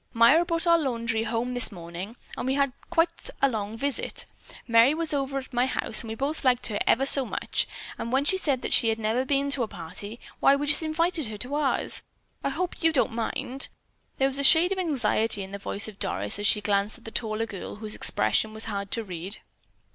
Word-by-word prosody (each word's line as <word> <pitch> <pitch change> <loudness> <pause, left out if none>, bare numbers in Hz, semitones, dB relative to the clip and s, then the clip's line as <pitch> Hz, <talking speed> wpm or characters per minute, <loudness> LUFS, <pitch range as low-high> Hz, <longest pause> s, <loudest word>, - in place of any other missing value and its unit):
"Myra 240 +9 +5
brought 335 -1 -1
our 335 -1 +5
laundry 230 -5 -1
home 235 +2 -2
this 245 -2 +6
morning, 175 +4 -8 0.2
and - - -4
we 265 - +1
had 275 -2 +1 0.2
quite 335 0 0
a 275 - +4
long 220 -3 -4
visit. 280 +2 -2 0.4
Merry 235 +5 +5
was 325 -1 0
over 275 -1 -2
at 265 -1 -7
my 245 +1 +2
house, 235 -3 +2
and 225 - -9
we 220 - -5
both 285 +6 -3
liked 250 -2 +2
her 205 -3 0
ever 265 +3 +4
so 275 0 +5
much, - - -2 0.3
and 230 - -4
when 270 +2 +1
she 380 - +5
said 275 -7 0
that - - 0
she 230 - +4
had 220 - 0
never 225 +4 -1
been 280 +1 0
to 275 - 0
a 230 - 0
party, 200 +6 -9 0.2
why 275 - +5
we 285 +1 -2
just 290 +1 +2
invited 320 -1 0
her 215 -1 -7
to 250 +6 -5
ours. 295 -2 +1 0.4
I - - 0
hope 350 +6 -4
you 325 -1 +4
don't 275 -6 +1
mind." 245 +3 -4 0.5
There 270 - +2
was 275 0 -1
a - - 0
shade 325 +6 +7
of 385 - -1
anxiety 225 - +1
in 190 - -10
the 200 - -6
voice 200 +1 +3
of 210 -2 -11
Doris 195 - 0
as 205 - +1
she 210 - +4
glanced 205 0 0
at 230 - -21
the 225 - -7
taller 220 -1 -1
girl, 200 -4 -8
whose 215 0 -1
expression 220 0 +1
was 220 - -1
hard 200 -2 -4
to 230 - -2
read. 185 +1 -4
245 Hz, 230 wpm, -26 LUFS, 215-280 Hz, 0.5 s, shade